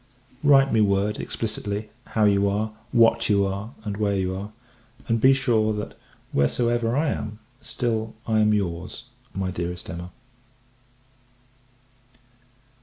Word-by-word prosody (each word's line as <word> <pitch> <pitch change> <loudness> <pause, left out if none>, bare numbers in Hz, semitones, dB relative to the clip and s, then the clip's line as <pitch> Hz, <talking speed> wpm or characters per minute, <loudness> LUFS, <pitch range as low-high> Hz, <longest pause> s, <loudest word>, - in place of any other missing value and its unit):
Write 135 -3 +5
me 110 - +4
word, 100 +1 +1
explicitly, 105 -1 -3 0.3
how 110 - +4
you 100 -1 +4
are, 105 +2 -1 0.2
what 115 -1 +4
you 100 -1 +4
are, 100 +4 -4
and 105 -2 -4
where 100 -1 +1
you 95 -1 -1
are; 100 +2 -6 0.6
and 115 -1 +1
be 130 - +7
sure 115 -5 +2
that, 105 0 -5 0.4
wheresoever 120 - +1
I 155 +1 +2
am, 105 0 -4 0.2
still 110 -3 -2
I 110 -1 +2
am 105 0 +4
your's, 95 +4 -2 0.3
my 95 -1 -1
dearest 90 0 -4
Emma. 85 +1 -7
105 Hz, 130 wpm, -24 LUFS, 100-115 Hz, 0.6 s, be